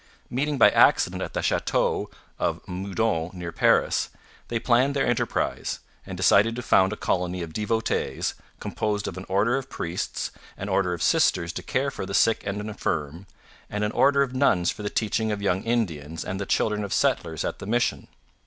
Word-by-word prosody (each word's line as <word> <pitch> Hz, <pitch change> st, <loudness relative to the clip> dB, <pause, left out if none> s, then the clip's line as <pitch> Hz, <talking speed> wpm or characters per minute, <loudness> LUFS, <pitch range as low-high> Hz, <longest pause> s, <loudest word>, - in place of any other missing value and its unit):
Meeting 145 Hz, +3 st, 0 dB
by 115 Hz, -, +7 dB
accident -, -, +4 dB
at -, -, -5 dB
the -, -, -1 dB
Chateau -, -, 0 dB, 0.3 s
of -, -, 0 dB
Meudon 95 Hz, -2 st, -1 dB
near 90 Hz, -2 st, -6 dB
Paris, -, -, +2 dB, 0.4 s
they 120 Hz, -, -1 dB
planned 130 Hz, +4 st, +2 dB
their 140 Hz, -, +2 dB
enterprise, 120 Hz, -1 st, -1 dB, 0.3 s
and -, -, -6 dB
decided 115 Hz, +3 st, +4 dB
to 125 Hz, -, -5 dB
found 95 Hz, -3 st, +4 dB
a -, -, -2 dB
colony 90 Hz, 0 st, -1 dB
of 80 Hz, -1 st, -8 dB
devotees, 110 Hz, +3 st, -1 dB, 0.3 s
composed 105 Hz, -1 st, -2 dB
of -, -, -5 dB
an 95 Hz, +1 st, -8 dB
order 105 Hz, +7 st, +2 dB
of 135 Hz, -, -6 dB
priests, 85 Hz, +1 st, -3 dB, 0.3 s
an -, -, -5 dB
order 90 Hz, -2 st, +1 dB
of 85 Hz, -, -4 dB
sisters 90 Hz, -, +2 dB
to -, -, -4 dB
care 140 Hz, +1 st, -1 dB
for 95 Hz, -, -6 dB
the 100 Hz, -, -3 dB
sick 115 Hz, +3 st, +3 dB
and 100 Hz, +1 st, -2 dB
infirm, 90 Hz, -5 st, -3 dB, 0.4 s
and 105 Hz, 0 st, -2 dB
an 105 Hz, -, 0 dB
order 140 Hz, +3 st, +4 dB
of 130 Hz, -2 st, -5 dB
nuns 95 Hz, -10 st, +3 dB
for -, -, -9 dB
the 105 Hz, -, -2 dB
teaching 110 Hz, 0 st, 0 dB
of 105 Hz, -, -2 dB
young 95 Hz, -2 st, 0 dB
Indians 85 Hz, -10 st, -2 dB
and 95 Hz, +1 st, -4 dB
the 100 Hz, -, -4 dB
children 105 Hz, -1 st, +1 dB
of 100 Hz, -, -3 dB
settlers 80 Hz, -1 st, 0 dB
at -, -, -3 dB
the -, -, -7 dB
mission. 120 Hz, +2 st, 0 dB
105 Hz, 190 wpm, -25 LUFS, 90-115 Hz, 0.4 s, by